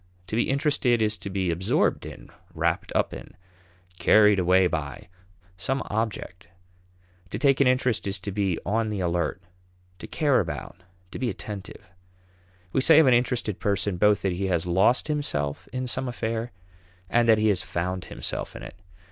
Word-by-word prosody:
To 95 - -5
be 115 - +1
interested 135 -3 +2
is 110 -1 +1
to - - -6
be 95 -2 -1
absorbed 90 +4 0
in, - - -11 0.2
wrapped - - -1
up - - +1
in, - - -10 0.6
carried 105 -2 +5
away 90 +1 +4
by, 75 -2 -4 0.5
some 135 +9 -1
object. 105 -5 -3 0.8
To - - -4
take 135 -1 +3
an 135 - +5
interest 125 -4 +1
is 100 +1 -1
to 100 - -4
be 95 -3 0
on 110 +3 0
the 105 -2 -3
alert, 90 0 -1 0.6
to - - -8
care 145 -5 +2
about, 90 - -5 0.3
to - - -7
be 125 -1 0
attentive. 100 -2 -8 0.9
We 135 - +2
say 155 +3 +6
of 160 - +7
an 130 - +5
interested 120 -4 0
person 100 -2 -1
both 105 +2 +3
that 95 - +1
he 95 +2 -2
has 85 -3 0
lost 95 - +2
himself 75 - -2
in 130 +2 -3
some 125 +2 -2
affair 115 -1 -3 0.6
and 120 +4 +2
that 110 - +6
he 110 0 +2
has 95 -3 +2
found 90 +2 -3
himself - - -5
in - - -8
it. - - -9
105 Hz, 175 wpm, -25 LUFS, 95-120 Hz, 0.9 s, of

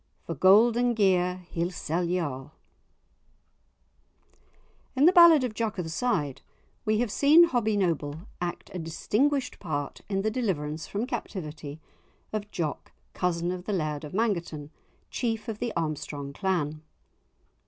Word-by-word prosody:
For 165 - -3
gold 210 - +5
and 245 -1 +2
gear 180 -3 +2
he'll 170 +1 -1
sell 175 -1 -2
ye 175 +1 0
a'." 135 -4 -4 2.5
In 270 +3 +4
the 350 - +8
ballad 340 -6 +8
of 245 -4 -2
"Jock 220 -1 -2
o' 180 - -1
the 160 - -6
Side," 160 - -1 0.4
we 215 0 +2
have 240 -4 -1
seen 300 +8 +6
Hobbie 220 -5 +1
Noble 160 -5 -1 0.2
act 175 -1 -4
a 185 - -4
distinguished 250 - 0
part 145 -6 -4
in 195 -1 0
the 220 - +1
deliverance 160 -10 -2
from 205 +4 -2
captivity 160 - -6 0.5
of 210 -1 -3
Jock, 160 -7 -4 0.2
cousin 175 -1 -1
of 180 0 -6
the 210 - -2
Laird 155 -5 -2
of 150 - -7
Mangerton, 170 -9 -1 0.4
chief 225 -3 -2
of 220 -2 -4
the 240 - -2
Armstrong 150 -3 -3
clan. 155 -5 -1
185 Hz, 145 wpm, -27 LUFS, 155-225 Hz, 2.5 s, the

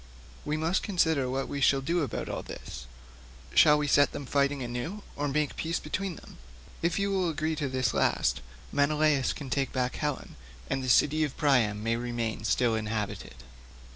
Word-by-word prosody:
We 150 +1 -1
must 165 +4 +1
consider 160 - +1
what 135 +1 -2
we 140 - -4
shall 140 +1 +4
do 165 +6 0
about 145 - -3
all - - -3
this; - - -9 0.7
shall 150 -1 +7
we 150 - 0
set 145 0 +4
them 140 - -5
fighting 140 0 +1
anew 125 +13 -5
or 145 0 -1
make 150 +1 0
peace 165 +1 -1
between 185 +3 -3
them? - - -14 0.4
If 170 +1 +1
you 200 0 0
will 185 -3 +1
agree 155 0 -1
to 145 -2 -1
this 130 -2 0
last 70 - +1 0.3
Menelaus 150 -1 +2
can 135 -4 -7
take 135 0 0
back 125 -1 -1
Helen 150 -2 -3 0.3
and 135 - -2
the 130 - -2
city 150 +5 +4
of 145 -3 -3
Priam 120 -9 +2
may 115 +1 +1
remain 120 -3 -3
still 115 +2 +2
inhabited." 105 - -3
140 Hz, 180 wpm, -29 LUFS, 125-155 Hz, 0.7 s, shall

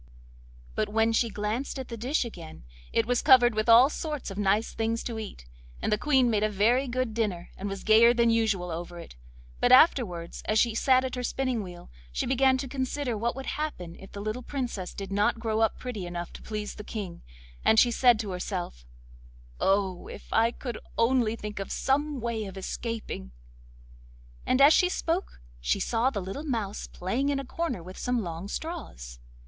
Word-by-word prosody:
But - - -1
when 225 +1 +2
she 230 +1 +2
glanced 215 +7 -3
at 265 - -6
the 235 - -5
dish 250 +5 0
again 170 - -9 0.3
it 230 - +2
was 245 +1 +1
covered 255 -4 +6
with 215 +2 -1
all 235 +3 +9
sorts 300 -5 -4
of 195 - -8
nice 205 +2 +1
things 225 +1 -1
to 230 -2 -4
eat, 200 - -8 0.3
and - - -2
the 210 - +3
Queen 265 -4 +3
made 215 -3 +1
a 215 - +2
very 230 +7 +2
good 250 -2 -1
dinner, 205 -6 -2
and 200 +1 -5
was 195 -1 -6
gayer 225 +2 +7
than 235 -1 +3
usual 215 -6 +1
over 175 +1 -6
it. 170 - -10 0.4
But 245 - +3
afterwards 220 - +4
as 215 - +2
she 230 +1 +3
sat 260 +3 +3
at 255 - -4
her 250 - -3
spinning 255 -2 -1
wheel 175 - -10 0.2
she - - -2
began 265 +1 +3
to 265 - -4
consider 260 -1 -2
what 235 +3 -1
would 270 0 -6
happen 180 - -4
if 195 - -13
the 200 - -6
little 215 +4 -3
Princess 245 -8 -4
did 195 -1 -6
not 205 +3 +2
grow 220 -1 -1
up 225 -1 +2
pretty 220 -8 -5
enough 175 0 -5
to - - -10
please 210 -1 -5
the 210 - -9
King, 200 -5 -6 0.4
and 220 - +5
she 240 - +5
said 240 0 +5
to 205 -3 -5
herself: 180 - -5 0.7
'Oh! 195 -2 +1
if - - -9
I 225 +1 +4
could 240 -1 -6 0.2
only 230 -1 +2
think 210 -2 -6
of 195 - -5
some 290 +1 0
way 230 -2 -2
of 195 -1 -8
escaping.' 195 - -5 1.1
As 275 +4 +6
she 360 - +4
spoke 350 +1 -2 0.2
she - - 0
saw 235 +2 +1
the 210 -7 -4
little 195 +10 -5
mouse 225 -9 -3
playing 240 +10 -2
in 280 -1 0
a 275 - -5
corner 260 - -3
with 185 +2 -10
some 245 -2 0
long 170 +1 -5
straws. 130 - -6
225 Hz, 195 wpm, -28 LUFS, 195-255 Hz, 1.1 s, all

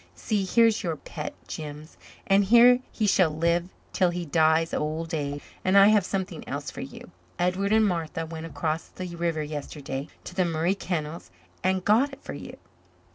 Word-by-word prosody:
See, 205 -3 -1
here's 225 +2 +4
your 170 -6 -2
pet, - - -7
Jims, 150 0 -7 0.3
and 195 0 +4
here 240 +4 +7
he 215 - -1
shall 190 -4 +4
live 170 +3 0 0.2
till 185 -2 +3
he 175 0 -3
dies 160 +1 +3
of - - 0
old 160 +2 -3
age. 145 -2 -3 0.2
And 190 +2 +4
I 200 +1 +8
have 210 -4 +3
something 185 -4 -3
else 140 +1 -4
for - - -7
you - - -9 0.3
Edward 185 +3 0
and 220 0 +5
Martha 165 -3 -2
went 160 0 -7
across 160 0 -2
the 180 -2 -7
river 165 -2 -1
yesterday 145 -2 -5 0.2
to - - -8
the 185 0 +2
Murray 170 +1 +1
Kennels 170 -4 -4 0.3
and 185 0 +1
got 250 +7 +3
it 275 - -12
for - - -6
you." - - -9
170 Hz, 185 wpm, -26 LUFS, 155-195 Hz, 0.3 s, I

